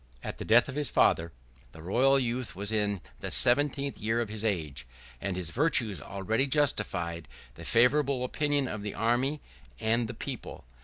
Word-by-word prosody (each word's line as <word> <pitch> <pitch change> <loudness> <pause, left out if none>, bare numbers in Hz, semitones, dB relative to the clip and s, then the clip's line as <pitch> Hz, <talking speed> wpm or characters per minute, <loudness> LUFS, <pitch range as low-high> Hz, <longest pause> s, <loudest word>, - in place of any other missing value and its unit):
At - - -6
the - - -5
death 115 +2 +5
of 140 - -6
his 145 -1 -2
father, 85 0 +2 0.4
the 80 - -12
royal 130 +9 +3
youth 125 -3 -2
was 100 +3 -4
in 105 -3 0 0.2
the - - -5
seventeenth 140 +2 +3
year 110 +2 0
of 115 -3 -2
his 110 0 -5
age; 75 - -2 0.3
and 95 -2 -3
his 85 -2 -4
virtues 120 - +2
already 110 +7 -1
justified 100 - 0 0.3
the - - -11
favorable 130 +2 +3
opinion 145 +1 0
of 110 -3 -5
the 105 0 -5
army 125 +6 0 0.4
and 115 +1 +1
the 120 - -7
people. 125 - -7
115 Hz, 170 wpm, -29 LUFS, 100-135 Hz, 0.4 s, death